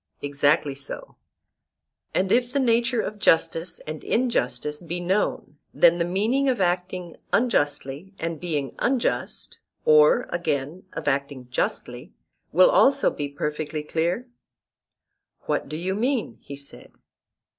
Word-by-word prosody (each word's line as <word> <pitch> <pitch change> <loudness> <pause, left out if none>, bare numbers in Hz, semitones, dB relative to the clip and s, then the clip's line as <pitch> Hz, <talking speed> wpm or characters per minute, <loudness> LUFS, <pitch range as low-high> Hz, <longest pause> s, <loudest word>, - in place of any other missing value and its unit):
Exactly 145 +1 +2
so. 140 +1 -4 1.0
And 190 +1 0
if 245 0 +3
the 280 - +1
nature 235 -1 +2
of 210 0 -5
justice 165 -1 +2
and 155 0 -6
injustice 150 - 0
be 175 +1 -4
known, 175 -4 -1 0.2
then 170 0 +5
the - - +3
meaning 225 +10 +1
of 250 -4 0
acting 180 -1 -1
unjustly 150 - 0
and 165 -1 -4
being 150 -7 -2
unjust, 255 -1 -1 0.3
or, 155 +11 +6
again, 170 +1 -2
of 165 - -6
acting 140 -2 -1
justly, - - -3 0.4
will 185 +3 +6
also 275 +1 +4
be 145 -1 -4
perfectly 150 +1 -3
clear? 170 +10 -1 1.1
What - - -2
do 155 - -4
you 180 +3 -2
mean? 240 +3 -1
he 140 - -8
said. 140 0 -8
170 Hz, 125 wpm, -24 LUFS, 150-215 Hz, 1.1 s, or